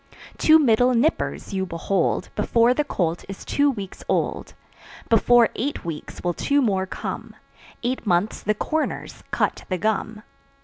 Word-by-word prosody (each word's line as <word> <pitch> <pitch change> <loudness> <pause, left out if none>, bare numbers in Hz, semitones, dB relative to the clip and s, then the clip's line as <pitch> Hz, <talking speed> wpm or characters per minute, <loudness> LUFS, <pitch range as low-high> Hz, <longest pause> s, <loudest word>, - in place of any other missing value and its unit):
Two 315 0 +7
middle 250 -3 +4
"nippers" 255 -4 0
you 190 -1 0
behold 170 +2 -1
Before 235 +1 +3
the 300 - +1
colt 175 - -2
is 195 - -8
two 285 0 +2
weeks 200 -8 -6
old, - - -1 0.5
Before 235 +1 +5
eight 280 -2 -3
weeks 160 -3 -7
will 175 0 0
two 285 - +1
more 195 -7 +1
come; - - -6 0.5
Eight 250 +2 -1
months 180 +3 +1
the 210 +1 0
"corners" 315 +8 -3
cut - - -1
the 185 - 0
gum. 215 +2 -2
220 Hz, 145 wpm, -23 LUFS, 190-255 Hz, 0.5 s, Two